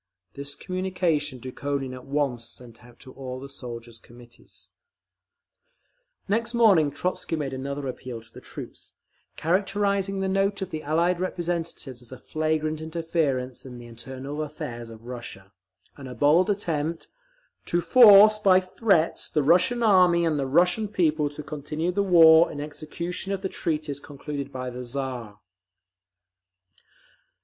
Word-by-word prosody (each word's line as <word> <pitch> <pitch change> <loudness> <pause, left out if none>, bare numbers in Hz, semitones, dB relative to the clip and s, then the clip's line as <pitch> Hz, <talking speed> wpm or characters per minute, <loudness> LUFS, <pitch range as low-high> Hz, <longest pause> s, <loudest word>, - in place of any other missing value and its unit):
This 140 +1 -6
communication 180 -7 -1
Dukhonin 135 +1 -4
at 130 0 -10
once 135 -4 -1
sent 120 -1 -11
out 120 -1 -17
to 130 - -12
all 130 -1 -7
the 135 - -8
soldiers' 120 -4 -8
Committees…. 120 +1 -16 1.6
Next 225 +3 0
morning 195 -11 +5
Trotzky 180 +1 -3
made 145 -4 -3
another 140 +2 -4
appeal 125 -2 -6
to 115 0 -19
the - - -11
troops, - - -10 0.4
characterising 195 +2 0
the 195 - -1
note 195 +1 0
of 190 - -7
the 155 - -4
Allied 170 +4 +1
representatives 170 -8 -4
as 120 - -13
a 130 - -8
flagrant 155 +1 -2
interference 160 -6 -2
in 125 -2 -10
the 120 - -11
internal 130 +5 -7
affairs 120 -6 -6
of 115 0 -13
Russia, 115 -5 -9 0.4
and 140 -2 -10
a 125 - -8
bald 150 - +4
attempt 165 -5 -2 0.6
"to 175 - +1
force 210 +2 +8
by 190 -3 +5
threats 185 -3 0
the 150 -2 +1
Russian 180 - +3
Army 180 -5 +5
and 155 -3 +1
the 135 - -1
Russian 175 +9 +2
people 155 -7 +1
to 150 +1 -9
continue 150 +3 -3
the 200 +3 0
war 165 -3 +7
in 145 - -7
execution 170 +6 -4
of 195 - -4
the 190 - -1
treaties 150 -5 -3
concluded 140 -1 -7
by 130 -1 -5
the 125 +1 -7
Tsar…." 120 -5 -5
150 Hz, 145 wpm, -25 LUFS, 130-180 Hz, 1.6 s, force